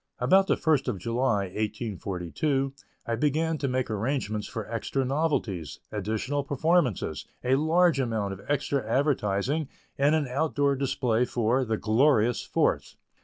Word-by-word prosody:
About 190 +10 +4
the - - +2
first 155 -5 +2
of - - -1
July, 115 +2 0
1842, 105 - -2 0.3
I 115 - -1
began 155 +4 0
to 140 - -1
make 130 -1 0
arrangements 110 -1 -2
for 110 -2 -5
extra 120 +4 -2
novelties, 125 - -1
additional 110 +7 -2
performances, 140 - 0 0.2
a 125 - +2
large 160 +2 +3
amount 110 -6 -1
of 95 - -10
extra 140 -1 0
advertising, 130 +2 0 0.3
and 145 +3 +4
an 155 -3 0
outdoor 140 +1 +1
display 125 -3 +1
for 120 +2 +1
the 110 -3 -1
"Glorious 115 +1 +3
Fourth." - - 0
130 Hz, 135 wpm, -27 LUFS, 110-145 Hz, 0.3 s, About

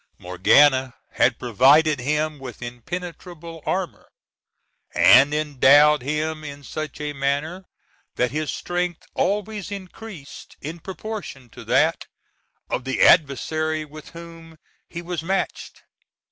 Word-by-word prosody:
Morgana 130 +9 +3 0.2
had - - +2
provided 140 +6 +4
him 150 +3 -1
with 125 -2 -9
impenetrable 165 +6 -8
armor, 185 -2 -3 0.9
and 135 +4 +7
endowed 150 0 +4
him 155 +3 -3
in 145 -1 -9
such 155 +2 -6
a 150 -1 -4
manner 145 +7 -2 0.5
that 125 -1 0
his 155 +2 -2
strength 175 -1 -3
always 205 0 -2
increased 190 -5 -10
in 160 +4 -7
proportion 190 - -7
to - - -11
that - - +1 0.6
of - - -3
the 135 0 -3
adversary 155 +1 +3
with 155 0 -12
whom 165 -1 -12 0.3
he 170 0 -7
was 175 -2 -4
matched. 190 +3 -3
155 Hz, 115 wpm, -23 LUFS, 140-170 Hz, 0.9 s, and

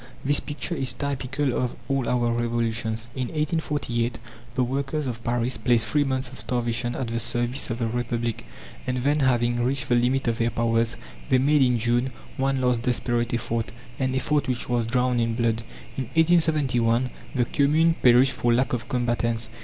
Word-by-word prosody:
This 145 +1 +4
picture 150 +4 -4
is 135 -6 -1
typical 135 0 -2
of 125 -1 -1
all 135 -3 0
our 120 -1 +1
revolutions. 115 -1 -1
In 130 -2 -2
1848 145 -6 -1 0.4
the 130 - +2
workers 140 +4 -2
of 120 -2 -4
Paris 120 +1 0
placed 120 -3 +3
"three 145 +6 +2
months 130 -2 -1
of 130 - -10
starvation" 120 0 -1
at 125 -3 -3
the 115 0 -1
service 120 +3 0
of 115 - -2
the 115 - -1
Republic, 120 -1 -2 0.4
and 130 0 0
then, 145 +4 +1
having 120 -3 +2
reached 135 +1 -1
the - - +3
limit 125 +2 +2
of 115 -1 0
their 115 0 +2
powers, 115 0 0 0.3
they 130 - +5
made, 145 +3 +3
in 125 -2 +4
June, 120 +3 +1 0.3
one 135 0 +1
last 125 -2 +1
desperate 120 -1 0
effort 115 -1 -2 0.3
an 130 0 0
effort 140 +2 0
which 125 -2 -1
was 120 -2 0
drowned 125 0 +1
in 115 -1 0
blood. 115 -1 0 0.4
In 130 - -2
1871 140 -8 +3 0.2
the 125 -2 +2
Commune 155 +6 +3
perished 125 +2 +6
for 120 - +1
lack 125 +3 +2
of 120 -1 -3
combatants. 120 -2 0
125 Hz, 175 wpm, -25 LUFS, 120-135 Hz, 0.4 s, perished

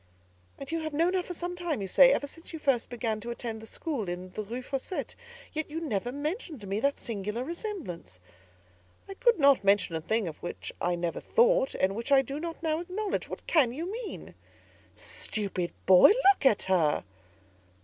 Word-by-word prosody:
"And 275 +2 -8
you 330 - 0
have 310 -2 -4
known 335 +4 +2
her 375 - +2
some 355 +1 -4
time, 345 -6 -2
you 195 - -3
say—ever 275 +7 +6
since 330 +4 -10
you - - -4
first 275 -6 +1
began 230 -3 -2
to 235 - -7
attend 230 -2 -5
the 220 - -10
school 260 - -3
in 180 +1 -5
the 215 - -4
Rue 240 +5 -6
Fossette:—yet 320 - -5
you 315 +2 -3
never 245 - -2
mentioned 305 - -4
to - - -8
me 195 +2 -1
that 280 +4 +1
singular 210 +1 -3
resemblance!" 295 - -6 0.9
"I 390 - -6
could 475 +4 +3
not 280 -7 +5
mention 200 -4 +3
a 160 - -2
thing 220 +4 0
of 155 - -7
which 175 - -6
I 175 0 +1
never 170 -1 -2
thought, - - +3
and 190 +1 +1
which 230 +5 -5
I 270 -1 +6
do 275 +3 -5
not 335 +1 -6
now 315 -1 +1
acknowledge. 380 +4 -3
What - - -7
can 270 -8 +3
you 335 +7 -4
mean?" 460 0 -7 0.6
"Stupid 195 -5 -3
boy! 185 -1 +9 0.3
look 285 - +2
at 215 - +3
her." 170 -6 +2
270 Hz, 190 wpm, -29 LUFS, 205-330 Hz, 0.9 s, boy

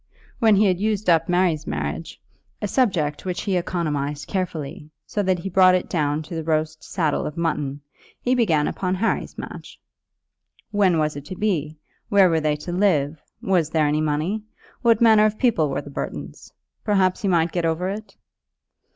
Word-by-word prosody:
When 220 -4 +5
he 210 +2 +4
had 185 -2 +2
used 210 -2 +1
up 165 0 +2
Mary's 175 -4 +1
marriage, 75 +2 -4 0.4
a 210 - -2
subject 180 - 0
which 180 -1 -3
he 195 -3 -1
economized 150 -5 -2
carefully, 160 -6 -4 0.2
so 205 - -2
that 190 -2 +1
he 170 - -6
brought 185 0 +5
it 180 - -1
down 150 -2 0
to 165 - -10
the 160 -1 -3
roast 155 0 -1
saddle 160 -5 -1
of 150 - -7
mutton, 150 -4 -2 0.4
he 250 - 0
began 170 -12 +2
upon 185 -1 -1
Harry's 215 +5 -1
match. - - -9 0.9
When 195 -5 +3
was 155 -1 0
it 145 0 -8
to 185 - -7
be? 160 -7 -1 0.3
Where 195 -3 +5
were 160 -1 +2
they 150 -1 +1
to 150 +4 -7
live? 160 -6 +1 0.2
Was 180 -5 +2
there 160 -1 +2
any 150 +1 +1
money? 155 +8 -1 0.4
What 230 -2 +3
manner 220 -2 +6
of 215 0 0
people 205 - +2
were 135 - -2
the 145 - -10
Burtons? - - -6 0.3
Perhaps 195 -4 +2
he 200 - -1
might 170 -3 +2
get 175 - -1
over 165 +2 0
it? 210 +3 -6
175 Hz, 180 wpm, -23 LUFS, 150-195 Hz, 0.9 s, manner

